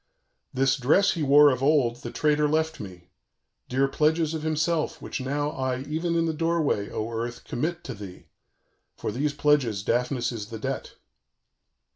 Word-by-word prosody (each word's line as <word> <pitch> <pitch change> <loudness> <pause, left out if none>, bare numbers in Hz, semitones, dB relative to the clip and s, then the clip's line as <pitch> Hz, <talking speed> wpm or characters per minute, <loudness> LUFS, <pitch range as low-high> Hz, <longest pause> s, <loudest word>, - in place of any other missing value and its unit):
_ - - -50 0.5
"This 135 0 +2
dress 155 +10 +3
he 165 - -4
wore 145 0 +7
of 130 0 -2
old 135 -5 +3
the 120 - -7
traitor 150 +2 +2
left 160 +1 0
me, 90 -3 -10 0.6
dear 135 +2 +2
pledges 155 +3 +1
of 160 - -3
himself; 155 +1 0
which - - -5
now 145 +3 -1
I 130 -2 -2
even 160 +4 -2
in 165 0 +2
the 160 - -1
doorway, 160 -10 0
O 110 +2 -4
earth, 120 +1 -4
commit 170 +7 -3
to 130 - -6
thee; 100 -4 -10 0.7
for - - -4
these 145 +5 -1
pledges 140 -9 +2
Daphnis 125 +2 0
is 110 -4 -6
the 115 0 -7
debt. 110 - -5
140 Hz, 170 wpm, -26 LUFS, 120-155 Hz, 0.7 s, wore